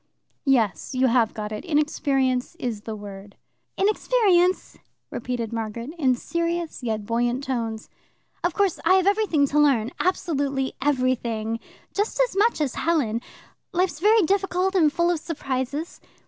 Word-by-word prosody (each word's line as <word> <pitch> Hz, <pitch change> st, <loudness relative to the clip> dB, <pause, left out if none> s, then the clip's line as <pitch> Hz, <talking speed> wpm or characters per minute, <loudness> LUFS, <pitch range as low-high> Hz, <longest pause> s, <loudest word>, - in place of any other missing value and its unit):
"Yes. 230 Hz, -4 st, +1 dB
You 255 Hz, +1 st, +3 dB
have 235 Hz, -3 st, +3 dB
got 210 Hz, -1 st, -5 dB
it. 215 Hz, -, -5 dB
Inexperience 280 Hz, -4 st, 0 dB
is 240 Hz, -10 st, -4 dB
the 220 Hz, 0 st, -6 dB
word." 200 Hz, -1 st, -10 dB, 0.4 s
"Inexperience," 390 Hz, -3 st, +2 dB, 0.3 s
repeated 235 Hz, -2 st, -3 dB
Margaret, 230 Hz, +3 st, -4 dB
in 260 Hz, -4 st, +3 dB
serious 335 Hz, +4 st, -2 dB
yet 220 Hz, -4 st, -2 dB
buoyant 240 Hz, +4 st, 0 dB
tones. 230 Hz, -4 st, -3 dB, 0.6 s
"Of 350 Hz, -1 st, 0 dB
course, 395 Hz, -4 st, +1 dB
I 375 Hz, -, +5 dB
have 375 Hz, -1 st, +3 dB
everything 400 Hz, -8 st, +3 dB
to 300 Hz, -, +2 dB
learn 255 Hz, -6 st, +3 dB
absolutely 285 Hz, -7 st, 0 dB
everything 245 Hz, -5 st, 0 dB, 0.3 s
just 415 Hz, +4 st, -1 dB
as -, -, +2 dB
much 430 Hz, +1 st, +3 dB
as 280 Hz, -4 st, 0 dB
Helen. 265 Hz, -9 st, 0 dB, 0.5 s
Life's 355 Hz, -4 st, 0 dB
very 425 Hz, +3 st, +5 dB
difficult 385 Hz, +1 st, +1 dB
and 325 Hz, -6 st, +4 dB
full 340 Hz, +2 st, +2 dB
of 340 Hz, -, -1 dB
surprises. 285 Hz, -1 st, -4 dB
280 Hz, 140 wpm, -24 LUFS, 235-350 Hz, 0.6 s, I